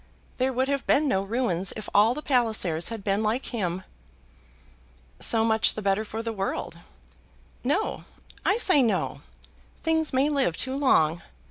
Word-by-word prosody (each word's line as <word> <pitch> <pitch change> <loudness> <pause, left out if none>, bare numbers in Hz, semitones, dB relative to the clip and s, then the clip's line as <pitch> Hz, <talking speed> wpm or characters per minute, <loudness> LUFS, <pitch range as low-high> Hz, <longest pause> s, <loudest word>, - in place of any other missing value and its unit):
There 260 +1 +1
would 260 +1 0
have 280 -1 -2
been 300 +1 +3
no 195 -8 +1
ruins 195 -3 -1
if 215 - -7
all 215 +4 +4
the 300 - -6
Pallisers 220 - 0
had 225 -3 -6
been 200 +1 0
like 220 +4 -1
him." 185 -5 -2 1.4
"So 225 -1 +4
much 220 -1 +2
the 215 - -4
better 195 +2 +1
for 220 +1 -6
the 230 -1 -3
world." 195 -2 -4 0.8
"No; 295 - -1 0.4
I 400 - +2
say 370 - +4
no. 235 -4 0 0.6
Things 320 -1 +1
may 265 +2 +2
live 275 - 0
too 260 +1 -1
long. 170 - +2
230 Hz, 155 wpm, -26 LUFS, 200-270 Hz, 1.4 s, all